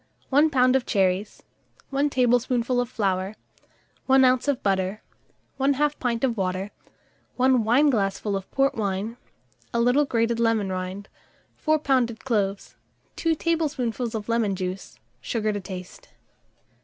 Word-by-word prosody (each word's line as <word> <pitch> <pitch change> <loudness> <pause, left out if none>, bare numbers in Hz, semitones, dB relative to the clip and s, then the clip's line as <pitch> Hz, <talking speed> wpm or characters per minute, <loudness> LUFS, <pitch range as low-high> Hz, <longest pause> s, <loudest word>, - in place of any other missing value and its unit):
1 290 +3 +4
lb. 255 -2 +3
of 265 - +2
cherries, 190 0 0 0.5
1 280 +2 +1
tablespoonful 245 -1 +1
of 245 - -4
flour, 195 -3 -1 0.7
1 265 0 +6
oz. 255 +1 +2
of 285 -3 0
butter, 195 +1 0 0.6
1/2 285 +2 +1
pint 235 -2 -1
of 250 -3 +1
water, 190 0 -2 0.6
1 255 -2 +3
wineglassful 220 -5 +2
of 195 -1 -5
port 275 0 +1
wine, 205 +1 -2 0.6
a 235 - 0
little 245 +5 +3
grated 230 -2 0
lemon 225 -4 +1
rind, 185 +2 -5 0.5
4 310 0 +1
pounded 255 -6 0
cloves, 205 -5 -1 0.4
2 330 -1 +1
tablespoonfuls 275 -8 -1
of 210 -1 -4
lemon 230 -4 +1
juice, 185 0 -5 0.2
sugar 215 - -1
to 205 - -3
taste. 185 - -9
235 Hz, 130 wpm, -25 LUFS, 200-265 Hz, 0.7 s, 1